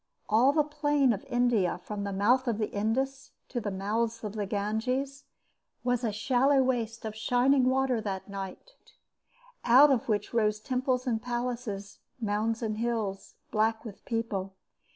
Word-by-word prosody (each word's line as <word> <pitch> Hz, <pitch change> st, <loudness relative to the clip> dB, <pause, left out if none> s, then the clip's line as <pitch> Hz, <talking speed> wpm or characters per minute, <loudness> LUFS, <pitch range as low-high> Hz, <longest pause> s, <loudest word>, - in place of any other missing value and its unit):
All 235 Hz, +6 st, +5 dB
the 300 Hz, +1 st, +3 dB
plain 290 Hz, -3 st, +2 dB
of 205 Hz, -, -6 dB
India 240 Hz, -8 st, +2 dB
from 210 Hz, 0 st, -5 dB
the 200 Hz, -, -3 dB
mouth 240 Hz, +7 st, +2 dB
of 230 Hz, -3 st, 0 dB
the 215 Hz, -1 st, -2 dB
Indus 265 Hz, +6 st, -2 dB, 0.2 s
to 240 Hz, -, -3 dB
the 205 Hz, -, -2 dB
mouths 220 Hz, +4 st, -2 dB
of 210 Hz, -2 st, -4 dB
the 210 Hz, -2 st, -3 dB
Ganges 250 Hz, +8 st, -2 dB, 0.6 s
was 245 Hz, 0 st, 0 dB
a 225 Hz, -, +1 dB
shallow 260 Hz, +5 st, +3 dB
waste 230 Hz, -3 st, -2 dB
of 215 Hz, -1 st, -4 dB
shining 250 Hz, +4 st, +3 dB
water 260 Hz, -2 st, +2 dB
that 195 Hz, -3 st, -4 dB
night, 195 Hz, -, -7 dB, 0.9 s
out 265 Hz, +5 st, +7 dB
of 245 Hz, -3 st, 0 dB
which 210 Hz, 0 st, -1 dB
rose 215 Hz, -2 st, +2 dB
temples 255 Hz, +2 st, -1 dB
and 225 Hz, -3 st, 0 dB
palaces, 240 Hz, -4 st, -4 dB, 0.2 s
mounds 220 Hz, +1 st, -1 dB
and 215 Hz, -1 st, -2 dB
hills, 225 Hz, -5 st, -2 dB, 0.2 s
black 220 Hz, +2 st, +1 dB
with 205 Hz, -3 st, -9 dB
people. 205 Hz, -5 st, -3 dB
230 Hz, 155 wpm, -29 LUFS, 210-255 Hz, 0.9 s, out